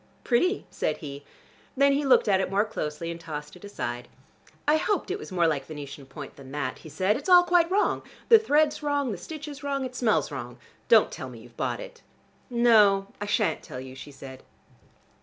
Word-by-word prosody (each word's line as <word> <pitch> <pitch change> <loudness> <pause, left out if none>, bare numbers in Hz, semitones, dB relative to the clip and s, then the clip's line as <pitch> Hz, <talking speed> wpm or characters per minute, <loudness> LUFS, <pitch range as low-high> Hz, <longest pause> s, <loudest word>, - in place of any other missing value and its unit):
"Pretty," 360 - +1
said - - -1
he. 140 -2 -8 0.5
Then 280 +1 +5
he 285 +2 +1
looked 265 - +5
at 195 -2 +3
it - - -2
more 200 +3 +2
closely, 165 -5 -4
and 170 - -7
tossed 150 -2 -7
it 180 - -15
aside. 120 -12 -5 0.6
"I 300 +1 +5
hoped 405 +2 -1
it 400 - -2
was - - -9
more 175 -2 +2
like 155 -4 0
Venetian 145 -3 -8
point 130 - -10
than 135 -1 -12
that," 140 -3 -3
he 155 - -11
said. 185 +8 +1
"It's 290 - -6
all 355 -1 +8
quite 350 -1 +3
wrong: 400 +3 +1 0.3
the 455 -2 +8
thread's 305 -7 +2
wrong: 285 -3 0
the 195 - -4
stitch 305 - -8
is 285 -1 -8
wrong: 275 -1 -2
it 255 0 -7
smells 225 -9 +1
wrong. 125 -3 -6 0.3
Don't - - +6
tell 130 - -6
me 120 - -11
you've 120 0 -16
bought - - -2
it." - - -10 0.5
"No, 215 -5 +4
I 205 - -3
shan't 210 0 +1
tell 125 - -8
you," 130 0 -9
she 135 +2 -10
said. 135 -1 -11
200 Hz, 210 wpm, -27 LUFS, -, 0.6 s, all